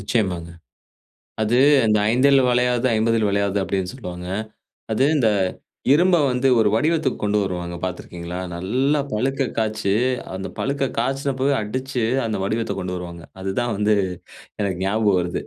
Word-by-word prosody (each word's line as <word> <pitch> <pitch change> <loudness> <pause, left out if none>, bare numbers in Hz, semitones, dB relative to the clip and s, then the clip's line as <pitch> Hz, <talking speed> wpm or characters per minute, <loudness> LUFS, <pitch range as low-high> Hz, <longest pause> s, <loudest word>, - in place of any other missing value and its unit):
நிச்சயமாங்க. 95 -6 -1 0.9
அது 115 +3 +2 0.3
இந்த 105 -1 +3
"5ல் 135 +3 +5
வளையாதது, 125 0 +2
50ல் 110 -1 +2
வளையாது" 100 0 0
அப்படின்னு 95 0 -2
சொல்லுவாங்க. 90 -7 -7 0.6
அது 130 +5 +2
இந்த 120 -6 +3 0.6
இரும்ப 175 +4 +5
வந்து 125 +2 +1
ஒரு 105 - +4
வடிவத்துக்கு 155 +2 +1
கொண்டு 105 0 +2
வருவாங்க 90 -2 -4
பாத்திருக்கீங்களா? 90 -1 -6 0.2
நல்லா 130 +12 +1
பழுக்க 135 +4 0
காய்ச்சி, 110 -2 0 0.4
அந்த 95 - -5
பழுக்க 140 -1 -1
காய்ச்சனப்பவே 135 +2 0
அடிச்சு, 130 +2 -3 0.2
அந்த 110 -2 -2
வடிவத்தைக் 110 +3 -2
கொண்டு 90 0 -3
வருவாங்க. 85 -1 -8 0.2
அதுதான் 110 +4 -1
வந்து, 105 0 +3 0.7
எனக்கு 95 -3 -1
ஞாபகம் 105 -2 +2
வருது. 85 0 -3
110 Hz, 130 wpm, -22 LUFS, 95-130 Hz, 0.9 s, 5ல்